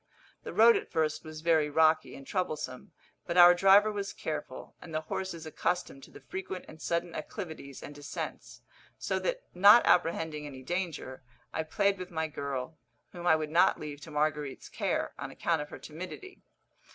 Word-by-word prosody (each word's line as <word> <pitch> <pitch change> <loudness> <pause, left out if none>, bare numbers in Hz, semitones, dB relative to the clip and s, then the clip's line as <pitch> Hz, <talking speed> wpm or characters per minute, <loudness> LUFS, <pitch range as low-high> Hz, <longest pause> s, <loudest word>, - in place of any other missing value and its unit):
The - - -7
road 230 +1 +7
at - - -6
first 155 -2 0
was 155 -1 -9
very 160 -2 +3
rocky 160 +1 +3
and 135 - -11
troublesome, 155 -9 -3 0.4
but 170 - -1
our 175 0 +10
driver 195 +4 +6
was 200 -1 -4
careful, 150 -4 -6
and 160 - -8
the 155 - 0
horses 170 0 -5
accustomed 155 -2 -2
to - - -18
the - - -14
frequent 190 -1 -5
and 155 0 -13
sudden 170 0 -1
acclivities 155 - -7
and 145 - -8
descents; 145 0 -7 0.4
so - - -1
that, - - -2
not 205 +6 +8
apprehending 160 -3 +1
any 130 -2 -10
danger, 170 -6 -4 0.3
I - - 0
played 200 +5 +1
with 185 0 -6
my 160 -2 -2
girl, 140 0 -5 0.3
whom 175 -1 -6
I 160 - +7
would 155 -1 -3
not 175 +4 +4
leave 150 -1 -7
to 160 - -10
Marguerite's 150 -2 -2
care, - - -1
on - - -5
account - - -1
of 150 - -7
her - - -8
timidity. 185 - -9
160 Hz, 175 wpm, -30 LUFS, 150-185 Hz, 0.4 s, our